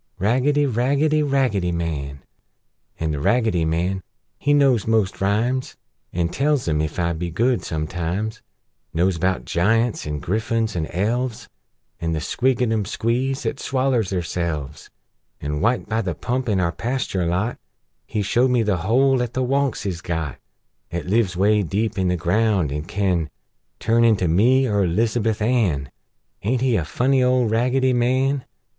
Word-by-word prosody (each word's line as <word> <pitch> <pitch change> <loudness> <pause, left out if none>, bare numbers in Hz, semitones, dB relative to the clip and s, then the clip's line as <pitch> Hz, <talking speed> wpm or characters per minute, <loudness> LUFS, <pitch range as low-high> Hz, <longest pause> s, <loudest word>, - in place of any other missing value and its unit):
Raggedy! 130 +8 +2
Raggedy! 140 +5 +2
Raggedy 130 -11 +1
Man! 70 -5 -4 0.8
An' 80 -1 -1
The 75 - -2
Raggedy 110 - +2
Man, 90 +4 -1 0.4
he 145 - +1
knows 135 -7 +3
most 110 -5 +1
rhymes 115 +6 0 0.3
An' 85 -1 0
tells 140 - 0
'em, 75 -1 +1
ef 75 0 -3
I 85 -1 0
be 85 +2 -4
good, 120 +9 +1
sometimes: 85 +7 -3 0.5
Knows 90 +1 +1
'bout 95 +1 0
Giunts, 115 +3 +1
an' 75 -1 -3
Griffuns, 110 - -1
an' 80 -2 -1
Elves, 115 +5 -2 0.5
An' 80 -1 -1
the 80 - -1
Squidgicum 120 - 0
Squees 125 +6 -1
'at - - -2
swallers 130 -6 0
therselves! 85 -5 -3 0.5
An', 75 +1 -3
wite 115 +4 +1
by 110 +1 0
the 90 -6 -3
pump 125 +5 -2
in 100 -3 +2
our 85 -2 +1
pasture 115 -7 -2
lot, 95 +8 -1 0.5
He 105 -2 -1
showed 120 +6 +2
me 125 -2 +2
the 105 -4 +1
hole 125 +8 +2
'at 120 -1 -3
the 130 - +1
Wunks 135 -2 0
is 90 -3 -3
got, 80 -5 -3 0.5
'At 85 -3 -3
lives 100 -3 +1
'way 105 +2 +3
deep 100 +3 -1
in 95 - +1
the 90 0 +1
ground, 95 -2 +1
an' 75 +2 -4
can 90 -4 0 0.5
Turn 115 +1 +2
into 110 -6 +3
me, 120 +11 +4
er 100 -5 +1
'Lizabuth 110 +3 0
Ann! 95 - +1 0.5
Aint 120 +6 0
he 130 -3 +2
a 85 - 0
funny 130 - +1
old 125 -3 +2
Raggedy 130 +3 +2
Man? 130 +2 +1
110 Hz, 155 wpm, -22 LUFS, 85-125 Hz, 0.8 s, me